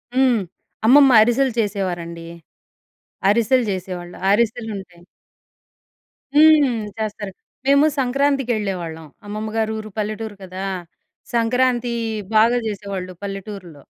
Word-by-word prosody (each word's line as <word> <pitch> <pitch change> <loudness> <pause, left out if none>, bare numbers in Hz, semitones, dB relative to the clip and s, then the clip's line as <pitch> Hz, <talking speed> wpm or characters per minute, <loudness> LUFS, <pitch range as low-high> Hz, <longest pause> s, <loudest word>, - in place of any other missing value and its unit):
హ్మ్. 255 -3 +4 0.5
అమ్మమ్మ 270 +3 +7
అరిసెలు 245 +4 +3
చేసేవారండీ. 175 -5 -3 1.0
అరిసెలు 235 +4 +3
జేసేవాళ్ళు, 180 -2 -5
అరిసెలుంటాయి. 210 -5 -1 1.3
హ్మ్. 295 -4 +5 0.2
చేస్తారు 210 -2 -4 0.4
మేము 280 +2 +5
సంక్రాంతికెళ్ళేవాళ్ళం 235 - -1 0.2
అమ్మమ్మ 215 +1 -4
గారి 220 -1 0
ఊరు, 215 0 -7
పల్లెటూరు 215 0 -3
కదా! 185 +1 -7 0.7
సంక్రాంతీ 240 +1 +1 0.4
బాగా 230 +3 +5
జేసేవాళ్ళు 200 -3 -5
పల్లెటూరుల్లో. 195 -6 -7
215 Hz, 85 wpm, -21 LUFS, 195-245 Hz, 1.3 s, అమ్మమ్మ